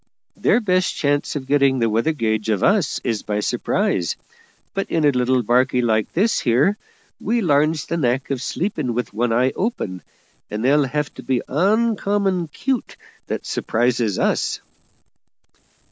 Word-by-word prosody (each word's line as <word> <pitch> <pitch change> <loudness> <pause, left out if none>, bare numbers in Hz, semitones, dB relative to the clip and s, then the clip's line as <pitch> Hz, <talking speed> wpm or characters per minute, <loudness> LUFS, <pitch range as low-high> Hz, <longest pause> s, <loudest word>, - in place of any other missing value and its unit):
Their - - +3
best 185 -3 +1
chance 145 0 0
of 140 -3 -4
getting 140 -1 +3
the 115 -2 +2
weather 115 +8 +1
gauge 110 -6 -1
of 105 -3 0
us 200 -7 +2
is 115 -4 -1
by 105 0 -2
surprise; 90 -4 0 0.6
but 195 - -3
in 160 -2 +1
a 145 - +5
little 125 -1 +1
barkie 125 +2 +2
like 110 -2 +1
this 210 +7 +2
here 135 - +2 0.4
we 235 +4 0
larns 155 -2 +2
the 170 - -2
knack 130 -1 0
of 130 -3 -2
sleeping 150 - -2
with 125 -3 -3
one 115 +2 0
eye 125 +3 +2
open, 105 - -3 0.5
and 105 +3 -3
they'll 145 +2 +4
have 150 +1 -2
to - - -10
be 130 0 -1
oncommon 200 - +1
'cute 255 - -3 0.3
that - - -4
surprises 120 -3 0
us." - - 0
135 Hz, 155 wpm, -21 LUFS, 120-170 Hz, 0.6 s, a